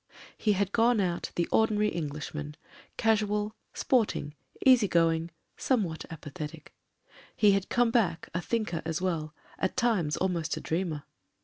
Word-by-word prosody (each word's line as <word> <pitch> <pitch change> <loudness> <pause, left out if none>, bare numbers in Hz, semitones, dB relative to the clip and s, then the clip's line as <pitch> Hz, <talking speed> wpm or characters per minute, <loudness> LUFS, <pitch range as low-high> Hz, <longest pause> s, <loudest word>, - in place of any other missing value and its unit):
He 210 - +2
had 200 0 0
gone 230 +1 +3
out 175 -3 -1
the 170 - 0
ordinary 210 -1 +3
Englishman 150 -1 -5 0.2
— - - -24
casual, 210 -1 +1 0.2
sport 245 -5 +2
ing, 145 - -5 0.3
easy 250 -5 +6
going, 165 -1 +2 0.3
somewhat 195 -12 0
apathetic; 155 0 -8 0.6
he 210 -2 +5
had 195 -1 0
come 240 -1 +3
back 215 -9 +1
a 170 - -1
thinker 210 -5 -1
as 160 -1 -2
well, 160 -4 -2 0.2
at 190 - -1
times 215 -12 +1
almost 170 -3 -1
a - - -3
dreamer. 160 -3 -2
185 Hz, 145 wpm, -29 LUFS, 160-215 Hz, 0.6 s, easy